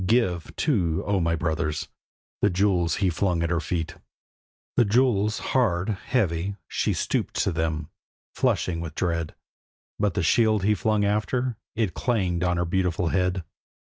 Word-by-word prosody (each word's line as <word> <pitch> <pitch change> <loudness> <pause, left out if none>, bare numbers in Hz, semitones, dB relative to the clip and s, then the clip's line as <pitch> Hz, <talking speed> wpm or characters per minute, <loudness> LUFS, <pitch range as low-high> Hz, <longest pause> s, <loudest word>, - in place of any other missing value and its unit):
Give, 95 -7 +1
too, 90 - +1
O 100 -1 +1
my 85 -1 +1
brothers!' 80 -2 -1 0.5
The 105 - +4
jewels 90 -3 +2
he 90 - +3
flung 85 -1 0
at 85 - -1
her 85 - +2
feet, 85 -1 -3 0.8
The - - +5
jewels 110 -2 +2 0.2
hard, 95 -7 +2
heavy; 100 -4 -1
she - - 0
stooped - - -1
to - - +1
them, 80 -2 -1 0.5
flushing 85 -2 0
with 80 -2 -6
dread, 85 -3 -1 0.6
But 105 -4 +1
the 95 - +1
shield 110 +2 +3
he 105 +2 +4
flung 105 -1 +1
after: 115 +4 0 0.2
it 110 -5 0
clanged 95 -8 0
on 90 -1 +1
her 85 - +1
beautiful 90 -1 0
head. 90 0 0
90 Hz, 150 wpm, -25 LUFS, 85-105 Hz, 0.8 s, The